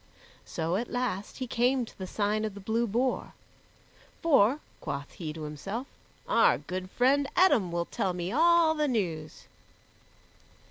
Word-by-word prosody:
So 165 +3 -1
at 235 +3 -3
last 245 -6 -3
he 260 - -3
came 250 +1 +1
to - - -15
the 190 - -6
Sign 210 +2 0
of 215 -2 -3
the - - -8
Blue 225 +4 0
Boar. 245 +5 -1 0.9
"For," 275 -4 +4 0.2
quoth 140 0 -5
he 165 -6 -6
to 155 0 -7
himself, 195 - -5 0.4
"our - - +4
good 185 0 -6
friend 275 +6 +2
Eadom 280 - +4
will 170 0 -1
tell 185 +1 -2
me 175 +1 -3
all 330 +3 +5
the 300 -1 0
news." 170 - -3
215 Hz, 150 wpm, -29 LUFS, 180-260 Hz, 0.9 s, all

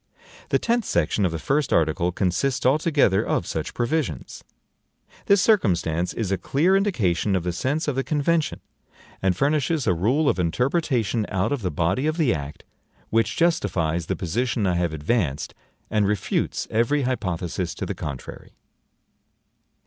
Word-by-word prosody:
The - - +3
tenth 235 0 0
section 85 +4 +1
of - - -4
the 80 - -3
first 140 - 0
article 80 +2 +2
consists 100 +9 -1
altogether 145 - +3
of - - -1
such - - -4
provisions. 120 - -2 0.8
This 200 -2 +5
circumstance 90 - +2
is 105 -5 -3
a 95 - 0
clear 170 +8 +2
indication 105 - +1
of 90 - 0
the 90 - -1
sense 140 - -1
of 145 - 0
the 135 - 0
convention, 155 +2 0 0.6
and 95 -2 +1
furnishes 150 - +1
a 95 - +3
rule 125 - +1
of 95 - +2
interpretation 120 - 0
out 95 +2 0
of 140 -4 -1
the 95 - -1
body 85 - 0
of 155 +1 -1
the 150 -8 +3
act, 70 -1 -6 0.5
which 115 0 +1
justifies 85 - +1
the - - -1
position 115 +5 -1
I 90 - +2
have 85 -1 0
advanced 80 - -1 0.4
and 105 -2 +2
refutes 105 -2 -1
every 120 +6 +2
hypothesis 90 -8 -2
to - - -4
the - - -3
contrary. 70 -4 -8
110 Hz, 155 wpm, -24 LUFS, 85-145 Hz, 0.8 s, This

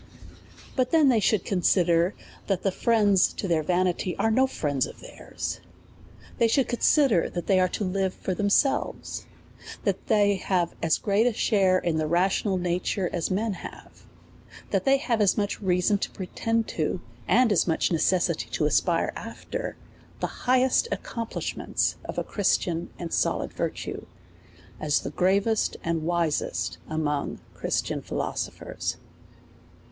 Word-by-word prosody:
But 255 -2 +1
then 310 -3 +5
they 235 -4 +4
should 210 -2 +1
consider, 175 -1 +2 0.3
that 195 -2 0
the 195 - +2
friends 205 -2 +3
to 195 - -4
their 165 -3 +2
vanity 180 +2 0
are 225 - +2
no 260 +4 +4
friends 145 - -1
of - - -12
theirs: - - -6 0.8
they 230 - +5
should 260 +3 +2
consi 280 +4 +4
der, 180 -8 +2
that 175 - -5
they 190 -2 +3
are 185 - +4
to 205 - -3
live 190 0 -1
for 190 - -3
themselves, 205 +8 0 0.6
that - - -1
they 205 -3 +3
have 180 -2 0
as 165 - +2
great 205 +3 +2
a 245 - +1
share 195 -4 +3
in 170 -3 -1
the 155 -1 0
rational 185 +3 +1
nature 180 +1 -1
as 170 -3 -1
men 210 +3 0
have; - - -11 0.7
that - - 0
they 275 0 +5
have 240 -5 0
as 200 -3 +3
much 205 0 -1
reason 185 +1 +2
to - - -2
pretend, 225 +4 -2 0.5
and 250 -3 +4
as 195 - +3
much 165 +1 +1
necessity 175 +2 +1
to - - 0
aspire - - +1
after - - -6 0.4
the - - -5
highest 255 - +4
accom 230 -1 -4
plishments - - -1
of - - -6
a - - 0
Christian 175 -4 0
and 170 -2 -5
solid - - 0
virtue, - - -4 0.7
as 150 -1 +1
the - - -5
grav 190 +2 +2
est 220 -2 0
and 165 -1 -1
wisest 170 -3 -1
amongst 150 -2 -2
Christian - - -2
philosophers. - - -4
190 Hz, 150 wpm, -26 LUFS, 175-220 Hz, 0.8 s, then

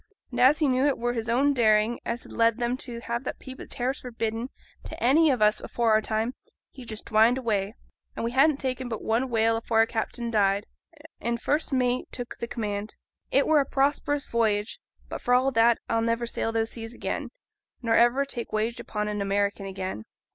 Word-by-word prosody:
And 245 - -4
as 260 +4 +6
he 310 - +2
knew 260 +2 +2
it 285 - +1
were 240 +1 -1
his 230 -1 -3
own 275 +5 +3
daring 220 -2 +3
as 235 0 -3
had - - -13
led 230 0 +2
him 240 +1 0
to 240 -3 -6
have 235 +1 -3
that - - -4
peep 260 -1 -10
at - - -9
terrors 260 +1 -2
forbidden 230 0 -3 0.4
to - - -7
any 295 +5 +5
on 245 -5 +1
us 210 0 +4
afore 235 -2 0
our 215 0 +4
time, 220 +3 -1 0.4
he 260 - -11
just 220 -2 -6
dwined 225 +3 +4
away, 215 -4 -1 0.4
and - - -3
we 235 - -1
hadn't 275 +3 +4
taken 260 -2 -3
but 225 - -5
one 235 +4 0
whale 225 -1 +2
afore 225 0 -1
our 225 - +6
captain 235 +1 -3
died, 200 -1 +2 0.5
and 235 0 -2
first 300 +6 0
mate 250 -1 +1
took 245 -1 -6
th' 235 - -4
command. 210 -2 -4 0.3
It 275 +1 +3
were 310 -1 +4
a - - +3
prosperous 285 +1 0
voyage; 220 -2 0 0.3
but, - - -6
for 245 - +3
all 260 +2 +3
that, 230 -1 +4
I'll 230 0 +1
never 230 +1 0
sail 230 -1 -2
those 225 0 -1
seas 225 0 -7
again, - - -4 0.5
nor 230 -1 +1
ever 240 +4 +4
take 240 -4 -5
wage 220 +2 -1
aboard 210 -1 -3
an 210 -1 -2
American 200 0 0
again.' 190 - -5
235 Hz, 210 wpm, -26 LUFS, 220-255 Hz, 0.5 s, as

